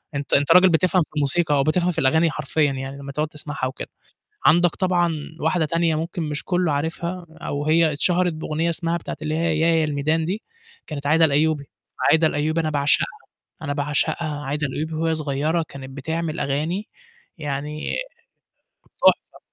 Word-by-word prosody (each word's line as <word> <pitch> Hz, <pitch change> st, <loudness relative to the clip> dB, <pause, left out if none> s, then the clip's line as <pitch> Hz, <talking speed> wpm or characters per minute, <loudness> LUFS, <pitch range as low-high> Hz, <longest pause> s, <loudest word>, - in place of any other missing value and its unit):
أنت 140 Hz, -1 st, -4 dB
أنت 145 Hz, +2 st, +3 dB
راجل 180 Hz, +2 st, +7 dB
بتفهم 180 Hz, +2 st, +3 dB
في -, -, -15 dB
الموسيقى 150 Hz, +2 st, +3 dB
أو 140 Hz, -, +3 dB
بتفهم 175 Hz, +4 st, +1 dB
في 165 Hz, -, -3 dB
الأغاني 160 Hz, +5 st, +3 dB
حرفيًا 150 Hz, 0 st, 0 dB
يعني، 135 Hz, +1 st, -5 dB
لمّا 140 Hz, 0 st, -7 dB
تقعد 150 Hz, +3 st, -1 dB
تسمعها 150 Hz, -3 st, -5 dB
وكده. 130 Hz, -, -6 dB, 0.6 s
عندك 175 Hz, +1 st, +5 dB
طبعًا 180 Hz, -3 st, +1 dB, 0.3 s
واحدة 160 Hz, +1 st, +1 dB
تانية 165 Hz, 0 st, +1 dB
ممكن 165 Hz, +3 st, -3 dB
مش 150 Hz, -1 st, -4 dB
كُلّه 180 Hz, -3 st, +1 dB
عارفها 170 Hz, +4 st, -3 dB, 0.2 s
أو 145 Hz, +1 st, -3 dB
هي 160 Hz, 0 st, +3 dB
اتشهرت 180 Hz, +4 st, +1 dB
بأغنية 160 Hz, +1 st, -2 dB
اسمها 170 Hz, 0 st, -1 dB
بتاعة 170 Hz, -, -7 dB
اللي 155 Hz, 0 st, -2 dB
هي 160 Hz, -, 0 dB
اسمها 160 Hz, +2 st, +2 dB
"يا، 165 Hz, -1 st, +3 dB
يا -, -, +2 dB
الميدان" 155 Hz, +2 st, 0 dB
دي، 195 Hz, +6 st, -3 dB, 0.5 s
كانت 145 Hz, -2 st, -5 dB
عايدة 160 Hz, +2 st, +5 dB
الأيوبي، 150 Hz, 0 st, +1 dB, 0.5 s
عايدة 160 Hz, 0 st, +5 dB
الأيوبي 155 Hz, +2 st, 0 dB
أنا 155 Hz, -, -1 dB
باعشقها، 145 Hz, -1 st, +2 dB, 0.6 s
أنا 145 Hz, -2 st, -2 dB
باعشقها. 150 Hz, +1 st, -1 dB
عايدة 150 Hz, +2 st, -1 dB
الأيوبي 155 Hz, +4 st, -4 dB
وهي 160 Hz, +1 st, 0 dB
صغيرة 155 Hz, +2 st, -1 dB
كانت 135 Hz, -1 st, -9 dB
بتعمل 160 Hz, +4 st, -3 dB
أغاني 155 Hz, +9 st, -2 dB, 0.5 s
يعني 150 Hz, 0 st, -4 dB, 1.2 s
تحفة. -, -, +3 dB
155 Hz, 170 wpm, -23 LUFS, 145-165 Hz, 1.2 s, راجل